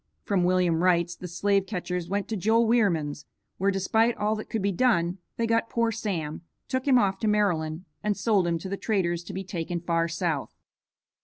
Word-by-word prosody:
From 195 Hz, -3 st, +1 dB
William 180 Hz, -2 st, +2 dB
Wright's 175 Hz, -1 st, +2 dB
the 180 Hz, -, -8 dB
slave 195 Hz, +3 st, +1 dB
catchers 180 Hz, -3 st, -3 dB
went 200 Hz, +1 st, -1 dB
to 225 Hz, -, -1 dB
Joel 220 Hz, +4 st, +3 dB
Wierman's, 175 Hz, -11 st, +1 dB, 0.3 s
where, 195 Hz, +2 st, +2 dB
despite 220 Hz, +4 st, +2 dB
all 210 Hz, +1 st, +1 dB
that 215 Hz, -, -7 dB
could 220 Hz, -3 st, -2 dB
be 200 Hz, -, +2 dB
done, 180 Hz, -4 st, +1 dB, 0.2 s
they 230 Hz, -, +1 dB
got 230 Hz, 0 st, +1 dB
poor 230 Hz, -1 st, +1 dB
Sam, 180 Hz, -10 st, -3 dB, 0.3 s
took 260 Hz, +1 st, -2 dB
him 260 Hz, -2 st, +6 dB
off 195 Hz, -4 st, +2 dB
to 220 Hz, -, -1 dB
Maryland 180 Hz, -5 st, +1 dB, 0.2 s
and 210 Hz, -1 st, 0 dB
sold 200 Hz, -3 st, +2 dB
him 170 Hz, -1 st, +1 dB
to 165 Hz, -, -7 dB
the 200 Hz, -, -3 dB
traders 175 Hz, -6 st, 0 dB
to -, -, -7 dB
be 190 Hz, -, -4 dB
taken 175 Hz, -2 st, -3 dB
far 165 Hz, -1 st, 0 dB
south. 165 Hz, -4 st, -2 dB
190 Hz, 200 wpm, -27 LUFS, 170-215 Hz, 0.3 s, him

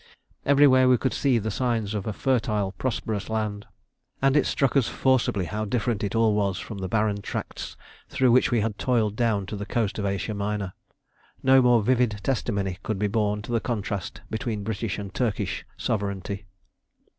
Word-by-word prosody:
Everywhere 135 Hz, -2 st, +6 dB
we 125 Hz, -, +6 dB
could 130 Hz, -, -1 dB
see 135 Hz, -4 st, +2 dB
the 110 Hz, 0 st, -2 dB
signs 115 Hz, -3 st, -1 dB
of 105 Hz, -1 st, -3 dB
a -, -, 0 dB
fertile 110 Hz, -5 st, 0 dB
prosperous 110 Hz, 0 st, -3 dB
land, 105 Hz, -2 st, -2 dB, 0.5 s
and 135 Hz, +1 st, +3 dB
it 150 Hz, -, +4 dB
struck 135 Hz, -2 st, +1 dB
us 135 Hz, -5 st, +4 dB
forcibly 130 Hz, -8 st, +1 dB
how 105 Hz, +5 st, -3 dB
different 110 Hz, 0 st, -1 dB
it 100 Hz, +2 st, -2 dB
all 115 Hz, -1 st, +4 dB
was 100 Hz, -3 st, 0 dB
from 105 Hz, 0 st, -7 dB
the 95 Hz, -, -3 dB
barren 105 Hz, +1 st, 0 dB
tracts -, -, -5 dB, 0.3 s
through 130 Hz, -2 st, +3 dB
which 125 Hz, -, +5 dB
we 120 Hz, -3 st, +2 dB
had 105 Hz, -1 st, -2 dB
toiled 110 Hz, -5 st, +1 dB
down 110 Hz, -4 st, +1 dB
to 105 Hz, -, -5 dB
the 100 Hz, -, -4 dB
coast 105 Hz, 0 st, -1 dB
of 100 Hz, -, -1 dB
Asia 100 Hz, +2 st, -2 dB
Minor. 100 Hz, -2 st, -2 dB, 0.7 s
No 130 Hz, 0 st, +6 dB
more 120 Hz, -3 st, +4 dB
vivid 120 Hz, -3 st, +2 dB
testimony 100 Hz, -7 st, -1 dB
could 110 Hz, -, -2 dB
be 105 Hz, -, 0 dB
borne 105 Hz, 0 st, 0 dB
to 120 Hz, -, -7 dB
the 115 Hz, -, +2 dB
contrast 105 Hz, -5 st, -3 dB
between 110 Hz, -1 st, -2 dB
British 110 Hz, -1 st, -3 dB
and 100 Hz, -2 st, -6 dB
Turkish 115 Hz, -6 st, -2 dB
sovereignty. 100 Hz, -1 st, -3 dB
110 Hz, 180 wpm, -26 LUFS, 100-120 Hz, 0.7 s, Everywhere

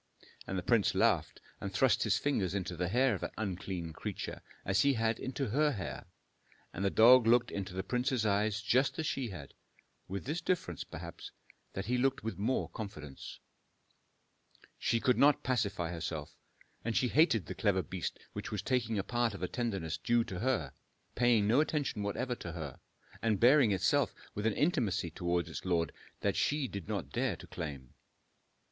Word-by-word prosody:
And 95 Hz, -, -2 dB
the 90 Hz, -, -2 dB
prince 115 Hz, 0 st, +3 dB
laughed -, -, +2 dB, 0.2 s
and 100 Hz, -, -4 dB
thrust 120 Hz, +7 st, +3 dB
his 105 Hz, -3 st, +3 dB
fingers 100 Hz, -, 0 dB
into 90 Hz, -2 st, -2 dB
the 90 Hz, +1 st, -1 dB
hair 125 Hz, +6 st, +3 dB
of 95 Hz, -, -4 dB
that -, -, -5 dB
unclean 90 Hz, -5 st, -4 dB
creature, -, -, -5 dB, 0.2 s
as 95 Hz, +1 st, +3 dB
he 140 Hz, 0 st, +4 dB
had 110 Hz, 0 st, 0 dB
into 130 Hz, -1 st, -3 dB
her 150 Hz, +6 st, +2 dB
hair. 90 Hz, -, -5 dB, 0.7 s
And 95 Hz, -, -3 dB
the 100 Hz, -, +3 dB
dog 120 Hz, +3 st, +7 dB
looked 120 Hz, 0 st, +4 dB
into 95 Hz, -2 st, -4 dB
the 95 Hz, -, -2 dB
prince's 125 Hz, 0 st, 0 dB
eyes 105 Hz, +1 st, +1 dB
just 130 Hz, +4 st, +2 dB
as 160 Hz, -, -1 dB
she 135 Hz, -5 st, -1 dB
had, 80 Hz, -8 st, -9 dB, 0.5 s
with 95 Hz, +2 st, -5 dB
this 155 Hz, +6 st, -2 dB
difference, 125 Hz, -, -1 dB
perhaps, -, -, -8 dB, 0.4 s
that 95 Hz, -, -4 dB
he 125 Hz, +2 st, +1 dB
looked 135 Hz, +2 st, +1 dB
with 110 Hz, -2 st, -4 dB
more 120 Hz, +6 st, 0 dB
confidence. 75 Hz, -, -8 dB, 1.4 s
She 115 Hz, -, +1 dB
could 125 Hz, +1 st, +2 dB
not 145 Hz, 0 st, +5 dB
pacify 100 Hz, -9 st, 0 dB
herself, 80 Hz, -3 st, -5 dB, 0.5 s
and 115 Hz, -1 st, 0 dB
she 125 Hz, -, +2 dB
hated 140 Hz, -, +4 dB
the 90 Hz, -, -5 dB
clever 95 Hz, 0 st, +1 dB
beast 95 Hz, -2 st, -4 dB, 0.2 s
which -, -, -5 dB
was 105 Hz, -3 st, -3 dB
taking 115 Hz, -3 st, 0 dB
a 100 Hz, -, 0 dB
part 120 Hz, 0 st, 0 dB
of -, -, -7 dB
the 90 Hz, -, -1 dB
tenderness 95 Hz, -9 st, -2 dB
due 120 Hz, +7 st, +2 dB
to 95 Hz, -5 st, -6 dB
her, 115 Hz, -, 0 dB, 0.4 s
paying 120 Hz, -4 st, +3 dB
no 120 Hz, +6 st, +4 dB
attention 150 Hz, -8 st, -1 dB
whatever 125 Hz, +5 st, -1 dB
to 85 Hz, -, -6 dB
her, 75 Hz, -6 st, -6 dB, 0.4 s
and 110 Hz, -4 st, +1 dB
bearing 125 Hz, -1 st, +6 dB
itself 95 Hz, -2 st, +2 dB, 0.2 s
with 105 Hz, +2 st, -1 dB
an 110 Hz, -, +2 dB
intimacy 115 Hz, -, +1 dB
towards 85 Hz, +1 st, -1 dB
its -, -, -6 dB
lord 85 Hz, -3 st, +1 dB, 0.3 s
that -, -, +1 dB
she 145 Hz, -2 st, +1 dB
did 100 Hz, -7 st, -7 dB
not -, -, -3 dB
dare -, -, 0 dB
to -, -, -12 dB
claim. 70 Hz, -5 st, -7 dB
105 Hz, 180 wpm, -33 LUFS, 90-125 Hz, 1.4 s, dog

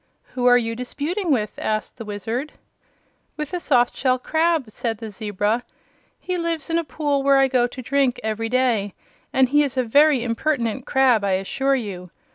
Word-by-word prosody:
"Who 250 Hz, -1 st, +1 dB
are 245 Hz, 0 st, +7 dB
you 230 Hz, -1 st, -2 dB
disputing 295 Hz, -, -3 dB
with?" 220 Hz, -7 st, 0 dB
asked 215 Hz, -1 st, -2 dB
the 225 Hz, -, -7 dB
Wizard. 225 Hz, +8 st, -4 dB, 0.8 s
"With 300 Hz, +2 st, -5 dB
a 360 Hz, -, -1 dB
soft 245 Hz, -7 st, +2 dB
shell 255 Hz, -1 st, +1 dB
crab," 315 Hz, -2 st, 0 dB
said 225 Hz, 0 st, -3 dB
the 225 Hz, -1 st, -7 dB
zebra. 210 Hz, +3 st, -1 dB, 0.6 s
"He 365 Hz, -1 st, -3 dB
lives 335 Hz, -2 st, -3 dB
in 330 Hz, -, +2 dB
a -, -, -2 dB
pool 290 Hz, 0 st, -1 dB
where 275 Hz, 0 st, +4 dB
I 270 Hz, 0 st, +5 dB
go 250 Hz, -2 st, +2 dB
to 255 Hz, -, -9 dB
drink 265 Hz, -1 st, +1 dB
every 220 Hz, +1 st, -2 dB
day, 235 Hz, -6 st, +1 dB, 0.4 s
and 265 Hz, -1 st, +4 dB
he 290 Hz, +2 st, +4 dB
is 275 Hz, -2 st, -2 dB
a 255 Hz, -, +3 dB
very 280 Hz, +2 st, +4 dB
impertinent 245 Hz, 0 st, -1 dB
crab, 255 Hz, -5 st, +3 dB
I 195 Hz, -1 st, +1 dB
assure 265 Hz, +9 st, 0 dB
you. 195 Hz, -7 st, -5 dB
255 Hz, 185 wpm, -22 LUFS, 225-285 Hz, 0.8 s, are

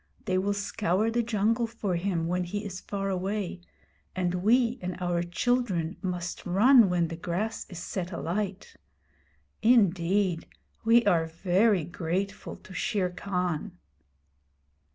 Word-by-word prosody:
They 185 Hz, 0 st, +1 dB
will 200 Hz, +2 st, 0 dB
scour 205 Hz, +1 st, 0 dB
the 240 Hz, +1 st, +1 dB
jungle 230 Hz, +1 st, +1 dB
for 215 Hz, -5 st, -3 dB
him 170 Hz, -2 st, -1 dB
when 180 Hz, +1 st, 0 dB
he 205 Hz, +4 st, -4 dB
is 185 Hz, -2 st, -5 dB
far 195 Hz, -1 st, -3 dB
away, 190 Hz, -1 st, -2 dB, 0.5 s
and 180 Hz, -1 st, 0 dB
we 235 Hz, +6 st, +2 dB
and 180 Hz, -1 st, -4 dB
our 175 Hz, -1 st, 0 dB
children 180 Hz, -1 st, 0 dB
must 180 Hz, -2 st, -4 dB
run 220 Hz, +4 st, +6 dB
when 175 Hz, -2 st, +1 dB
the 165 Hz, -, -5 dB
grass 180 Hz, +7 st, -3 dB
is 180 Hz, -, -8 dB
set 180 Hz, +1 st, -4 dB
alight. 190 Hz, +3 st, -3 dB, 0.9 s
Indeed, 195 Hz, -5 st, +3 dB, 0.4 s
we 230 Hz, +1 st, +5 dB
are 170 Hz, -5 st, +3 dB
very 185 Hz, +3 st, +2 dB
grateful 175 Hz, +4 st, -3 dB
to 190 Hz, -, -14 dB
Shere 200 Hz, -4 st, 0 dB
Khan!' 180 Hz, -, -3 dB
190 Hz, 130 wpm, -28 LUFS, 175-215 Hz, 0.9 s, run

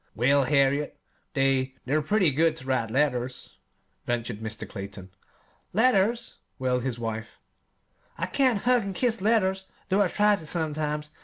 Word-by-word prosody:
'" -, -, -43 dB
"Well, 135 Hz, +5 st, +3 dB
Harriet, 140 Hz, +1 st, +2 dB, 0.4 s
they 135 Hz, -1 st, +1 dB
they're 145 Hz, +5 st, +1 dB
pretty 180 Hz, +1 st, +2 dB
good 160 Hz, +4 st, +2 dB
ter 130 Hz, -, -7 dB
write 130 Hz, -4 st, 0 dB
letters," 125 Hz, -1 st, -1 dB, 0.5 s
ventured 115 Hz, -2 st, -2 dB
Mr. 110 Hz, 0 st, -5 dB
Clayton. 95 Hz, -2 st, -8 dB, 0.6 s
"Letters!" 230 Hz, +1 st, +2 dB, 0.2 s
wailed 125 Hz, -1 st, 0 dB
his 125 Hz, -1 st, -2 dB
wife. 110 Hz, -1 st, -5 dB, 0.8 s
"I -, -, -1 dB
can't 255 Hz, -7 st, +1 dB
hug 250 Hz, 0 st, +4 dB
an' 195 Hz, -2 st, -4 dB
kiss 235 Hz, -3 st, 0 dB
letters, 190 Hz, -3 st, +1 dB, 0.2 s
though 195 Hz, +2 st, +3 dB
I 200 Hz, -, +4 dB
try 210 Hz, +2 st, +3 dB
to, 160 Hz, -, -10 dB
sometimes. 150 Hz, -2 st, -2 dB
150 Hz, 150 wpm, -26 LUFS, 125-195 Hz, 0.8 s, hug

